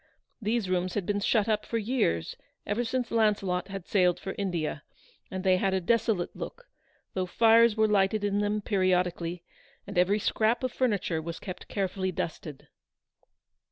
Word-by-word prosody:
These 220 -1 0
rooms 185 0 -1
had 200 - -1
been 205 +1 0
shut 210 +1 +2
up 215 -1 +1
for 230 - -2
years, 215 - 0 0.3
ever 210 +4 0
since 245 0 -2
Launcelot 200 -5 +1
had 195 -2 -7
sailed 180 -3 +2
for 190 - -5
India, 170 -6 -2 0.5
and 185 0 -5
they 185 -1 +4
had 190 0 +1
a - - +2
desolate 210 -1 0
look, - - -8 0.5
though 185 -1 -1
fires 230 +2 +5
were 220 0 +4
lighted 205 0 +2
in 205 0 +1
them 210 +1 0
periodically, 180 -3 0 0.4
and 200 -3 -1
every 190 +3 +3
scrap 220 +3 +1
of 255 - 0
furniture 205 -11 0
was 165 +1 -5
kept 185 -3 -8
carefully 190 -1 -2
dusted. 155 -4 -5
200 Hz, 160 wpm, -28 LUFS, 180-220 Hz, 0.5 s, fires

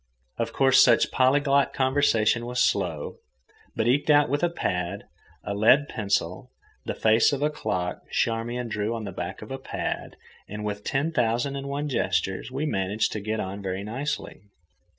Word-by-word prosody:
Of 115 - -1
course, 135 -1 +5
such - - +4
polyglot 140 +2 +3
conversation 120 -4 +2
was 125 0 -2
slow, 90 -10 0 0.6
but, 110 - 0
eked 140 +5 +2
out 145 -2 +5
with 145 +2 0
a 175 - +2
pad, 90 - -3 0.4
a 100 - -3
lead 120 +8 +4
pencil, 100 0 -2 0.4
the - - -3
face 110 +1 +4
of 140 0 -1
a 150 - +2
clock 90 -10 -3
Charmian 120 +2 -1
drew 105 +1 -2
on 115 - -5
the 100 - -5
back 90 - -6
of - - -11
a - - -4
pad, - - -4 0.3
and 105 +1 -5
with 105 0 -4
ten 140 +4 0
thousand 120 0 0
and 140 0 -5
one 145 +2 -2
gestures, 95 - -1
we 135 +4 -3
managed 100 -5 0
to 105 - -3
get 110 +2 -3
on 100 0 -4
very 95 0 -3
nicely. 135 +3 -4
115 Hz, 170 wpm, -26 LUFS, 100-140 Hz, 0.6 s, course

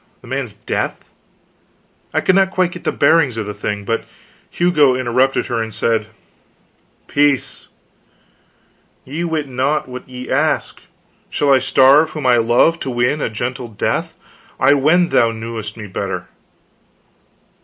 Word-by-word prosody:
The - - -15
man's - - -4
death? - - -4 1.0
I - - 0
could 185 - +3
not 190 0 +3
quite 185 -2 0
get - - -10
the - - +1
bearings 145 -8 +3
of 110 - -3
the 105 - -5
thing. 105 0 -4
But 115 +2 -2 0.4
Hugo 150 -7 +3
interrupted 130 +1 +1
her 120 -3 -2
and 110 0 -4
said: 110 0 0 1.0
"Peace! 145 -2 0 1.4
Ye 150 +6 -4
wit 160 -4 -2
not 135 +4 -1
what 125 0 -9
ye 125 0 -8
ask. - - 0 0.5
Shall 140 -1 +2
I 135 - +5
starve 135 +4 +5
whom 155 -3 -6
I 125 -1 +5
love, 120 +9 +3
to 135 - -4
win 125 +4 0
a - - -1
gentle 120 +3 -4
death? 110 -3 -2 0.4
I 130 +2 +5
wend 160 +5 +3
thou 115 - +4
knewest 110 -1 -6
me 110 - -7
better." 95 -2 -4
130 Hz, 145 wpm, -18 LUFS, 115-150 Hz, 1.4 s, I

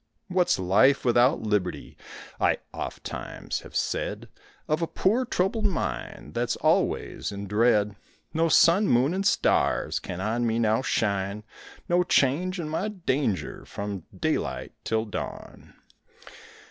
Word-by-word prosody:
What's 180 -1 +2
life 100 +11 +3
without 125 +4 +4
liberty? 105 -4 -2 0.4
I - - +3 0.2
ofttimes - - -5
have - - -13
said, - - -2 0.4
Of 155 +2 0
a 165 - 0
poor 225 +11 +1
troubled 210 +1 0
mind 190 - -4
That's - - 0
always - - 0
in 100 0 -6
dread; 105 0 +2 0.4
No 165 +1 +2
sun, 185 +6 +5
moon, 130 +7 +3
and 195 +1 0
stars - - +2
Can 90 - -6
on 115 +4 0
me 115 0 0
now 110 0 +2
shine, 100 -3 -1 0.4
No 175 +1 +3
change 175 +3 +2
in 160 - -3
my 160 +7 -1
danger 145 - -2
From 100 -3 -6
daylight - - -1
till 110 0 0
dawn. 105 - -7
125 Hz, 130 wpm, -26 LUFS, 105-175 Hz, 0.4 s, sun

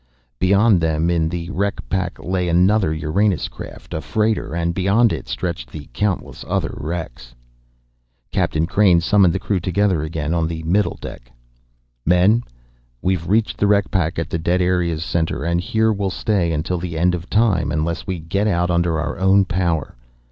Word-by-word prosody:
Beyond 100 0 +4
them 80 +1 +1
in 80 -2 +1
the 85 +1 -5
wreck 100 +1 -2
pack 90 -3 -2
lay 90 -1 -2
another 90 +1 +3
Uranus 80 +5 0
craft, - - -10
a 80 - -2
freighter, 110 -4 -1
and, 85 0 0
beyond 100 +6 +3
it, - - -6
stretched - - -4
the 75 -2 -9
countless 100 +6 -2
other - - -1
wrecks. 75 -7 -6 1.0
Captain 80 +1 +1
Crain 95 -1 +4
summoned 95 +1 +4
the 90 - -1
crew 95 0 -1
together 90 -1 +1
again 80 0 -3
on 85 -2 +1
the 80 -1 -5
middle 95 +6 +1
deck. - - -10 0.7
"Men, 90 - +4 0.6
we've 90 -3 0
reached 110 +2 +1
the 100 - +3
wreck 100 -1 +2
pack 85 -4 0
at 80 -1 -3
the 85 - -1
dead 90 +3 +1
area's 90 -3 0
center, 80 -1 -1
and 85 +1 0
here 110 +4 +1
we'll 100 -1 -1
stay 95 -3 0
until 80 +3 -1
the 85 -2 -5
end 90 +2 +2
of 90 0 -5
time 95 -10 +2
unless 80 +4 -2
we 95 -2 -2
get 95 +6 -1
out 90 -3 +1
under 85 -2 +1
our 80 - -3
own 95 +1 +4
power. 85 -6 -1
90 Hz, 175 wpm, -20 LUFS, 80-100 Hz, 1.0 s, Beyond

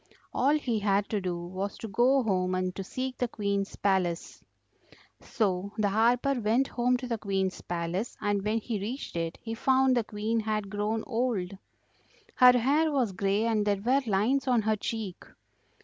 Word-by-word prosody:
All 280 +4 +3
he 245 -7 -1
had 200 0 +1
to 210 -2 -1
do 180 -2 -2
was 185 +3 -5
to 225 - -6
go 250 +5 +3
home 185 -4 0
and 185 0 -2
to 195 - -4
seek 255 +6 -5
the 245 - +1
Queen's 200 -3 -2
palace. 185 -4 -1 0.8
So 200 -2 -1
the 210 -2 +2
harper 240 +6 +2
went 230 +6 +2
home 250 +1 +1
to 250 0 -6
the 230 -2 -2
Queen's 195 -2 -1
palace, 175 +5 -3
and 205 -1 0
when 215 +2 0
he 220 -2 -3
reached 230 +5 -5
it 165 0 -3
he 225 - -4
found 260 +2 +3
the 240 - +2
Queen 215 +2 -2
had 215 -2 -2
grown 210 +2 -1
old; 225 -6 -1 0.8
her 250 0 +7
hair 295 +6 +2
was 255 -7 +1
grey 200 +3 0
and 220 -2 +1
there 205 -1 +1
were 255 +7 +2
lines 225 +8 +1
on 245 -4 +3
her 220 +1 +2
cheek. 215 -3 -5
215 Hz, 180 wpm, -28 LUFS, 195-245 Hz, 0.8 s, her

